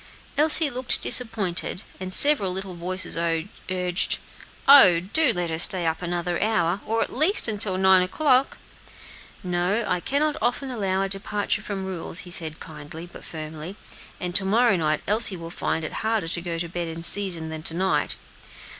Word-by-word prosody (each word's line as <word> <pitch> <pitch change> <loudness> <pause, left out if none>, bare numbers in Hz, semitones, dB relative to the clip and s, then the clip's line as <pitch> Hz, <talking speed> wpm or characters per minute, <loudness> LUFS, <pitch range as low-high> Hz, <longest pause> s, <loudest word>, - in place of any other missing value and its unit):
Elsie 305 0 +6
looked 250 0 -1
disappointed, 215 -5 -1 0.2
and 185 0 -7
several 265 -5 +7
little 190 0 -6
voices 180 +2 -4 0.5
urged, 180 0 -1 0.5
"Oh, 205 -12 +7
do 260 - 0
let 175 -4 -4
her 160 - -4
stay 175 0 +5
up 160 +1 -3
another 175 0 -4
hour, 205 -3 -1
or 225 +1 -1
at - - -10
least 310 - +5
till 190 -3 0
nine 190 -1 +4
o'clock." 260 +7 0 0.9
"No; 180 +5 -2
I 180 -2 -1
cannot 295 - -2
often 260 +2 -3
allow 195 -5 -2
a - - -2
departure 205 +2 -3
from 200 -3 -6
rules," 185 0 -7
he 175 - -11
said 160 -3 -2
kindly, 155 +1 -11
but - - -13
firmly; 155 +3 -9 0.4
"and 180 -1 -6
to 195 - +2
morrow 225 +2 +1
night 155 -3 -2
Elsie 210 -2 +4
will 165 0 -10
find 160 - -4
it 160 - -7
harder 220 -5 -2
to 175 - +1
go 170 -1 -6
to 170 +1 -5
bed 175 0 -6
in 165 0 -8
season 170 -3 +4
than 160 0 -8
to 165 +1 -7
night. 190 +2 -1
185 Hz, 170 wpm, -22 LUFS, 170-220 Hz, 0.9 s, several